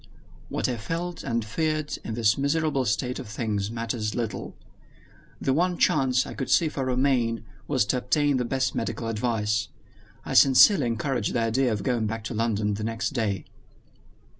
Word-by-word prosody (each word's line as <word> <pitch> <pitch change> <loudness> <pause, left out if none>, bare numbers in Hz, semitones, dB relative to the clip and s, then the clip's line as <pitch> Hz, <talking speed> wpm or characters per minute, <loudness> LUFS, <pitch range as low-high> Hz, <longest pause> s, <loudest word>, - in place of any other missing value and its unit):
What - - -1
I 125 -2 -2
felt 165 +10 -4
and 115 -1 -1
feared 155 +5 -1
in 110 - -4
this 110 -2 +3
miserable 140 -1 0
state 125 +4 -1
of 130 - -7
things 105 -2 -2
matters 115 -2 -3
little. 115 -3 -4 0.8
The 135 - +1
one 175 +4 +1
chance 130 -3 +3
I - - -7
could 135 - -4
see 165 - +4
for 135 -3 -3
Romayne 125 -3 +1 0.2
was 130 -7 +2
to 125 - 0
obtain 145 +1 +1
the 125 - 0
best 130 +2 0
medical 115 - -3
advice. 110 -1 0 0.6
I - - -4
sincerely 135 - +6
encouraged 115 0 -1
his - - -1
idea 115 +2 +1
of 105 -3 -2
going 120 -3 0
back 115 +1 -4
to 110 - -5
London 110 -2 0
the 105 +1 -4
next 115 +3 -2
day. 105 -9 -1
120 Hz, 170 wpm, -26 LUFS, 110-135 Hz, 0.8 s, sincerely